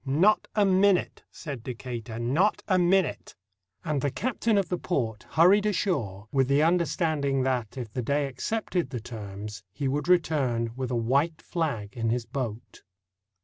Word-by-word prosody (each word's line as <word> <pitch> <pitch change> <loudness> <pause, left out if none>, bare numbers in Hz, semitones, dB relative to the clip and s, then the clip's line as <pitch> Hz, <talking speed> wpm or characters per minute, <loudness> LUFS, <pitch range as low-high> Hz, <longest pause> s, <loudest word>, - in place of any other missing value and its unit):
"Not 165 +10 +3
a 210 -2 +4
minute," 195 0 +3
said 140 -7 -7
Decatur, 115 -1 -6
"not 165 - +1
a 185 -3 +3
minute"; 180 0 +1 0.5
and 150 -4 0
the 145 - +1
captain 225 - 0
of 195 -4 +1
the 180 - -1
port 115 -11 -2
hurried 190 +7 +5
ashore 120 - -1
with 135 -2 +2
the 140 +2 +3
understanding 160 -5 +1
that 125 -2 -1
if 120 -4 -6
the 125 - -2
Dey 140 +4 0
accepted 175 - -2
the 125 -2 -4
terms 105 -2 -8
he 135 +7 -3
would 145 +4 -1
return 140 -10 +2
with 130 -1 -3
a 125 - -1
white 140 +8 +1
flag 135 - -3
in 115 -1 -1
his 120 0 -1
boat. 120 -5 -5
140 Hz, 160 wpm, -27 LUFS, 120-175 Hz, 0.5 s, hurried